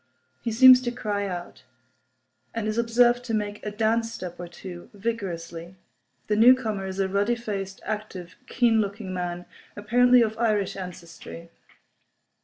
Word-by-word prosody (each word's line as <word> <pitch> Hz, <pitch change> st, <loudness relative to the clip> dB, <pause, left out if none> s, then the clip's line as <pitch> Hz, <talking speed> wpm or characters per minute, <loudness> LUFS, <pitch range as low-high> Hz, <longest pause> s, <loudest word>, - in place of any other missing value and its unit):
He 230 Hz, -, -2 dB
seems 255 Hz, +2 st, +8 dB
to 240 Hz, -1 st, -2 dB
cry 205 Hz, -4 st, -3 dB
out; 175 Hz, -2 st, -7 dB, 0.9 s
and 225 Hz, -2 st, -2 dB
is 215 Hz, +2 st, -1 dB
observed 240 Hz, +1 st, +3 dB
to 225 Hz, -2 st, -1 dB
make 210 Hz, -1 st, -4 dB
a 210 Hz, -, -3 dB
dance 225 Hz, +2 st, 0 dB
step 180 Hz, -5 st, -8 dB
or 175 Hz, -, -6 dB
two, 175 Hz, 0 st, -10 dB
vigorously. 180 Hz, -5 st, -5 dB, 0.5 s
The 210 Hz, -, 0 dB
newcomer 220 Hz, -4 st, +4 dB
is 190 Hz, +1 st, -6 dB
a 195 Hz, -, +1 dB
ruddy 200 Hz, +5 st, +1 dB
faced, 200 Hz, -4 st, -5 dB
active, 210 Hz, -5 st, -6 dB
keen 230 Hz, -3 st, +2 dB
looking 200 Hz, -1 st, -5 dB
man, 175 Hz, -1 st, -4 dB, 0.3 s
apparently 245 Hz, +4 st, +4 dB
of 220 Hz, 0 st, -3 dB
Irish 210 Hz, -4 st, 0 dB
ancestry. 170 Hz, -2 st, -9 dB
210 Hz, 145 wpm, -25 LUFS, 185-230 Hz, 0.9 s, seems